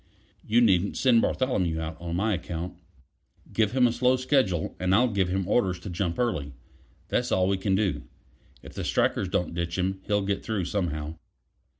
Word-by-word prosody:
You 115 +3 +3
needn't 100 -4 +3
send 120 -4 +4
Bartholomew 95 -11 0
out 80 0 -4
on 85 -1 -4
my 105 +4 +1
account." 85 -1 -4 0.8
"Give 110 -1 +1
him 130 -1 +4
a 120 - +3
slow 125 +2 +3
schedule, 130 - +1
and 90 +1 +2
I'll 125 +5 +4
give 100 -5 0
him 95 0 -1
orders 95 -4 +2
to 95 - -6
jump 85 -1 -2
early; 85 - -1 0.6
that's - - 0
all 95 0 +3
we 100 0 +1
can 95 0 0
do. 100 -1 0 0.6
If - - -11
the - - -5
strikers 95 - +1
don't 90 -1 -1
ditch 85 +1 -3
him, 95 +1 -1
he'll 105 -1 +1
get 100 0 -2
through 105 -5 -2
somehow." 80 -5 -3
95 Hz, 185 wpm, -27 LUFS, 85-110 Hz, 0.8 s, send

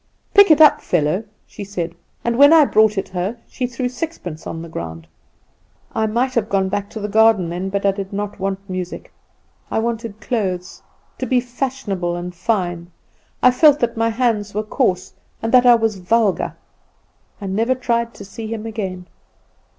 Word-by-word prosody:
"'Pick 405 -2 +7
it 310 -1 +6
up, 305 -2 +7
fellow,' 175 +4 0 0.2
she - - -9
said; 175 -4 -4 0.3
and 235 0 +1
when 285 +4 +7
I 320 -2 +7
brought 215 -4 +3
it 195 - -2
her 190 +5 -3
she 250 - -3
threw 250 +1 -3
sixpence 250 - -6
on 165 0 -5
the - - -8
ground. 80 - -7 0.9
I 220 0 0
might 245 +4 0
have 225 -3 0
gone 190 -1 +1
back 205 +1 -3
to 220 - -7
the 210 - -3
garden 215 -4 +4
then; 180 +3 -3
but 200 +1 -2
I 200 - +5
did 195 -1 -6
not 205 +1 -4
want 195 +1 -3
music; 185 -2 -6 0.6
I - - -2
wanted 225 -2 -3
clothes, 190 -6 -3 0.3
and - - -38
to - - -1
be 255 -2 +3
fashionable 240 -8 -3
and 175 +1 -5
fine. 175 -3 -2 0.5
I 255 - +7
felt 295 +3 +5
that 235 -1 0
my 230 0 +1
hands 220 -4 -1
were 215 - 0
coarse, 200 -5 -1 0.3
and 225 - -3
that 250 -1 +6
I 240 - +8
was 225 -3 0
vulgar. 205 +2 +1 0.8
I 200 - -7
never 225 +7 +1
tried 235 -2 -1
to - - -10
see 220 +3 -7
him 220 0 -5
again. 190 -5 -5
215 Hz, 185 wpm, -20 LUFS, 190-235 Hz, 0.9 s, I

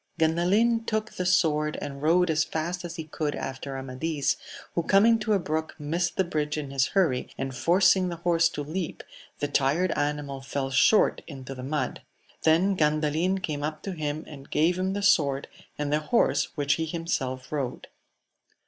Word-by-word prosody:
Gandalin 190 +9 +3
took 215 0 -1
the 180 - -3
sword 150 -4 +2
and 140 -1 -6
rode 170 +3 +3
as 155 - +2
fast 175 +3 -3
as 170 -1 -6
he 165 - -5
could 155 -1 -3
after 135 +1 -5
Amadis, 135 +3 -1 0.4
who 170 - +1
coming 215 +6 +4
to 215 0 0
a - - +4
brook 160 -1 -3
missed 165 +4 -2
the 190 - +4
bridge 155 -4 -2
in 145 -3 -4
his 135 -1 +2
hurry, 145 -10 +2
and 135 0 -3
forcing 185 +6 +4
the 170 - -4
horse 170 0 +2
to 145 - -5
leap, 165 +4 -4 0.3
the 145 - -1
tired 145 +6 +1
animal 145 -2 -2
fell 135 0 -3
short 205 - +4
into 135 -3 -8
the 130 - -8
mud; 145 +4 -2 0.4
then 175 +5 +3
Gandalin 155 +4 +1
came 150 -4 -2
up 155 +1 -4
to 195 - -4
him 155 -2 -3
and 140 -2 -11
gave 175 +4 +2
him 190 +1 0
the 200 0 -3
sword, 140 -8 +3 0.3
and 150 0 -1
the 150 - +3
horse 190 +10 +2
which 140 -1 +2
he - - 0
himself 135 -6 -3
rode. 135 -5 -3
155 Hz, 180 wpm, -27 LUFS, 145-180 Hz, 0.4 s, coming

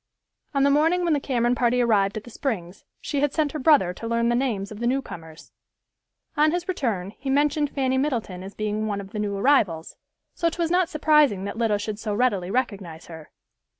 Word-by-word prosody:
On 275 - +3
the 280 - +4
morning 325 +5 +3
when 340 -2 +2
the 290 - +2
Cameron 245 -3 0
party 245 0 +1
arrived 210 -4 +2
at 215 - -6
the 240 - -12
Springs, 200 -9 -4 0.2
she 285 - -2
had 290 0 0
sent 305 -3 +1
her 305 - -5
brother 260 - +4
to 230 - -7
learn 235 0 +1
the 240 - +2
names 225 -6 -1
of 215 - -8
the 235 - -1
newcomers. 170 -11 -5 0.8
On 305 +1 +4
his 350 +2 -2
return 225 - -2
he 270 - -5
mentioned 290 +1 +2
Fanny 260 -2 0
Middleton 235 -10 -2
as 195 +2 -9
being 215 0 -2
one 205 -1 -2
of 195 -1 -9
the 210 - -5
new 205 -1 -2
arrivals, 195 - +1 0.4
so 335 - 0
'twas 335 0 -2
not 360 -1 +2
surprising 300 - +3
that 200 - -5
Lida 220 -3 +2
should 210 0 -5
so 210 -2 -3
readily 205 -7 +1
recognize 195 -8 -3
her. 160 -2 -11
240 Hz, 210 wpm, -24 LUFS, 200-285 Hz, 0.8 s, the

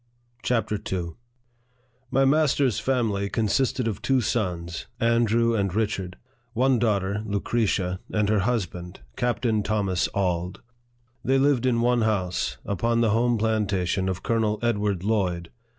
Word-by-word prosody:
CHAPTER 110 -4 0
IL 85 -3 -3 0.9
MY 135 +1 +3
master's 140 -4 +2
family 110 -7 0
consisted 115 +3 0
of 105 -2 -3
two 130 +2 +2
sons, 90 -8 -2
Andrew 115 0 +2
and 100 -4 0
Richard; 100 -4 -2 0.4
one 125 +1 +2
daughter, 100 -2 0
Lucretia, 100 -3 -1
and 105 -1 +1
her 105 0 +2
husband, 95 -5 -3
Captain 120 -2 0
Thomas 100 -3 0
Auld. 90 -2 -1 0.6
They 135 +1 +2
lived 135 -2 +3
in 115 -2 +2
one 120 0 +2
house, 95 -5 -1
upon 115 +4 0
the 115 -2 +3
home 120 +2 +2
plantation 100 -4 0
of 95 0 -4
Colonel 110 -2 +1
Edward 105 -5 0
Lloyd. 90 -6 -1
110 Hz, 130 wpm, -25 LUFS, 95-120 Hz, 0.9 s, MY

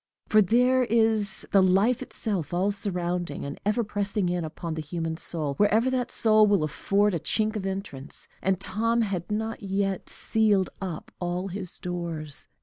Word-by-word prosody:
For 215 - +6
there 250 +5 +4
is 220 -3 +1
the 195 - +6
Life 195 +7 +3
itself, 195 - -2
all 190 +3 +2
surrounding, 180 -6 -3
and 140 +1 -6
ever 215 +4 +1
pressing 205 -2 -1
in 175 -1 -1
upon 160 +1 -5
the 160 - -3
human 160 +1 -3
soul, 160 -3 -3
wherever 220 +5 +3
that 250 -2 -1
soul 215 -1 +4
will 200 -6 +3
afford 200 +6 +1
a 170 - 0
chink 215 +6 0
of 195 -2 -2
entrance; 190 -9 -6
and 190 0 +1
Tom 230 +5 0
had 190 -5 -3
not 220 +2 -2
yet 195 -1 -1
sealed 210 -4 +1
up 180 -5 -5
all 180 +2 -2
his 185 -1 -6
doors. 170 -4 -4
195 Hz, 165 wpm, -26 LUFS, 175-215 Hz, -, For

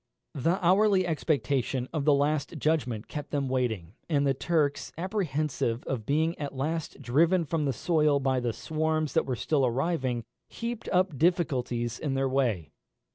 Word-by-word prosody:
The 165 +7 +1
hourly 190 +1 +4
expectation 140 -5 0
of 150 -3 -1
the 150 - +6
last 145 +3 0
judgment 130 -8 0
kept 150 -1 -6
them 140 -2 -1
waiting; 115 -9 -1 0.2
and 145 -3 +2
the 135 - +3
Turks, 145 0 0
apprehensive 155 - -1
of 115 -5 -4
being 160 +4 +1
at 145 -2 -4
last 155 +1 -3
driven 165 +8 +3
from 155 0 -1
the 140 - +1
soil 150 0 +2
by 130 -1 +1
the 120 -1 -1
swarms 155 +5 -1
that 160 - +2
were 130 - 0
still 145 +3 +1
arriving, 130 -1 0 0.3
heaped 235 0 -5
up 180 -6 +1
difficulties 130 -9 +1
in 140 -3 -2
their 135 0 +1
way. 120 - 0
145 Hz, 160 wpm, -28 LUFS, 130-160 Hz, 0.3 s, the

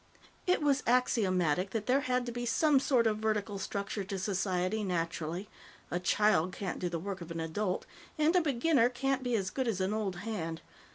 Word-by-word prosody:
It 360 -4 +2
was 285 -1 +3
axiomatic 185 -8 +2
that 215 +1 -3
there 260 +2 +3
had 250 -2 0
to 240 - -4
be 240 +1 -4
some 285 +4 +3
sort 255 -3 +2
of 215 -1 +1
vertical 210 -2 -1
structure 200 +1 -3
to 195 0 -4
society, 190 +1 0
naturally. 170 0 -2 0.4
A 175 - 0
child 185 -2 +2
can't 190 0 -4
do 180 - -1
the 170 - -2
work 190 +2 -5
of 170 - -8
an 165 0 -4
adult, 180 +4 -2 0.3
and 310 +3 +3
a 360 - +6
beginner 275 -3 +3
can't 270 +1 -1
be 245 -2 0
as 190 -4 -1
good 260 -2 -1
as 215 -5 0
an 190 +2 0
old 210 -4 -1
hand. 175 -5 -4
210 Hz, 195 wpm, -31 LUFS, 180-245 Hz, 0.4 s, a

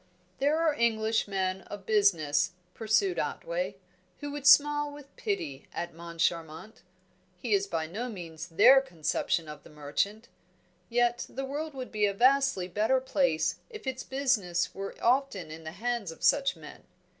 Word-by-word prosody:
"There 290 +4 +2
are 325 -2 +3
English 225 -3 +1
men 190 -1 -1
of 205 -2 -8
business," 175 -9 +2 0.2
pursued 225 - +1
Otway, - - -3 0.4
"who 290 -1 -5
would 285 -1 -2
smile 295 +1 +6
with 290 -1 -13
pity 150 - -4
at 170 0 -5
Moncharmont. 170 +2 -3 0.6
He 215 +4 -2
is 200 0 +2
by 165 -4 -2
no 215 +10 -5
means 170 -5 -7
their 255 +11 +7
conception 165 - -1
of 150 -1 -9
the - - -16
merchant. 160 +9 -2 0.6
Yet 240 0 +1
the 270 +1 -4
world 295 +2 -5
would 255 -1 -6
be 210 -1 +2
a 200 - -2
vastly 260 -5 +3
better 215 +8 +2
place 265 - +1
if 430 -8 -10
its 260 0 -3
business 240 -12 0
were 195 0 -6
often 235 - +1
in 160 +1 -9
the 160 - -6
hands 235 0 -2
of 165 - -13
such 275 -1 +3
men. - - -12
220 Hz, 155 wpm, -29 LUFS, 175-270 Hz, 0.6 s, their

